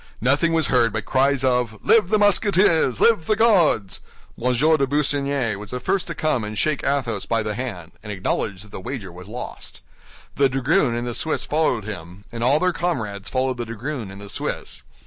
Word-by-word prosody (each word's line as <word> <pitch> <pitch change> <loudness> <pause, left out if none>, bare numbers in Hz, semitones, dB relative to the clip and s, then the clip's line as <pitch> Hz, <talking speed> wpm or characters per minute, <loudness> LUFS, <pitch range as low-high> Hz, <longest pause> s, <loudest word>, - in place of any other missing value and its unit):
Nothing 140 +7 +2
was 160 -2 +2
heard 120 -4 +3
but 105 0 -4
cries 135 0 +2
of 125 -4 +1
"Live 215 -5 +4
the 215 - +3
Musketeers! 195 - +3
Live 215 -9 +3
the 215 - +3
Guards!" 180 - +3 0.3
M. 125 +2 0
de 145 +3 +3
Busigny 140 -4 0
was 105 0 -9
the 125 - -4
first 185 +9 -1
to 170 - -5
come 150 -7 0
and 105 0 -5
shake 155 +2 +1
Athos 125 -8 -1
by 115 -1 +1
the 105 0 -2
hand, 100 -9 -5
and 105 - -7
acknowledge 95 0 -2
that 105 - -14
the - - -7
wager 100 -4 -6
was 90 +2 -11
lost. 120 +4 -7 0.6
The 140 -1 +4
dragoon 135 0 +1
and 120 +1 -3
the 120 - -3
Swiss 160 +6 -1
followed 150 -7 0
him, 95 -2 -8
and 115 0 -4
all 135 +5 +4
their 180 +1 +1
comrades 110 - -3
followed 130 -1 -1
the 120 - -3
dragoon 115 0 -5
and 95 +1 -10
the 100 - -9
Swiss. - - -4
125 Hz, 200 wpm, -22 LUFS, 110-155 Hz, 0.6 s, Live